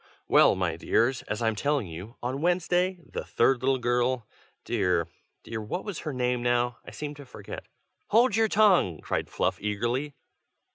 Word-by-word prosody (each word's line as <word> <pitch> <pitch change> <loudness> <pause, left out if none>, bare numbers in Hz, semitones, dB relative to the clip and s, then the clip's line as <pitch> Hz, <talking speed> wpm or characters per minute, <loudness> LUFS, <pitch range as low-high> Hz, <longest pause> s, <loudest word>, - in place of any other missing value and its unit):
"Well, - - +6
my 90 -3 -1
dears, 120 +8 +1
as 105 +2 -2
I'm 110 0 +2
telling 140 +2 0
you, 90 +7 -9
on 130 +3 -2
Wednesday, 180 +2 +1
the - - -5
third 125 +1 +2
little 135 +1 +2
girl 120 -1 0 0.4
dear! 90 -7 +1 0.4
dear! 110 -1 -5
what 110 - -4
was 205 -6 -4
her 155 - -4
name 125 -2 0
now? 120 0 +1
I - - -10
seem 150 -1 -6
to 145 -1 -11
forget - - -9 0.2
" - - -49
"Hold 230 -1 +4
your 225 0 +4
tongue!" 195 - +4
cried - - -2
Fluff, - - -1
eagerly. 120 +8 -2
125 Hz, 175 wpm, -27 LUFS, 110-150 Hz, 0.4 s, Well